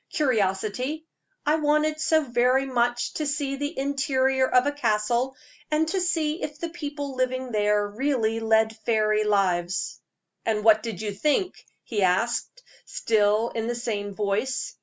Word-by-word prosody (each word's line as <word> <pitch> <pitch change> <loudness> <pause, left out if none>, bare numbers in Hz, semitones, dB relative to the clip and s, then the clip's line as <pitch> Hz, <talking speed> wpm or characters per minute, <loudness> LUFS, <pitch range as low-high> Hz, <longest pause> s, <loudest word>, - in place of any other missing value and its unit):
"Curiosity. 250 +4 0 0.4
I 300 +2 +3
wanted 305 0 +1
so 315 0 +3
very 250 +1 +2
much 245 -2 0
to 305 - -2
see 285 -1 -1
the 290 +1 -4
interior 270 -1 +1
of 250 +1 +4
a 290 - +1
castle, 240 0 0 0.3
and 310 +1 +1
to 380 +2 0
see 330 -3 0
if 295 0 -4
the 335 - -3
people 290 -4 -5
living 255 0 -1
there 210 -1 +2
really 225 0 0
led 220 0 +2
fairy 215 -1 +1
lives." 185 -4 0 0.4
"And 215 -2 0
what 220 -1 +6
did 220 -3 -5
you 210 - -2
think?" 300 - 0 0.2
he 215 -4 -2
asked, 230 - 0 0.2
still 215 +1 +1
in 225 0 -3
the 240 - -1
same 205 -4 -3
voice. 215 +6 -1
245 Hz, 150 wpm, -25 LUFS, 215-290 Hz, 0.4 s, what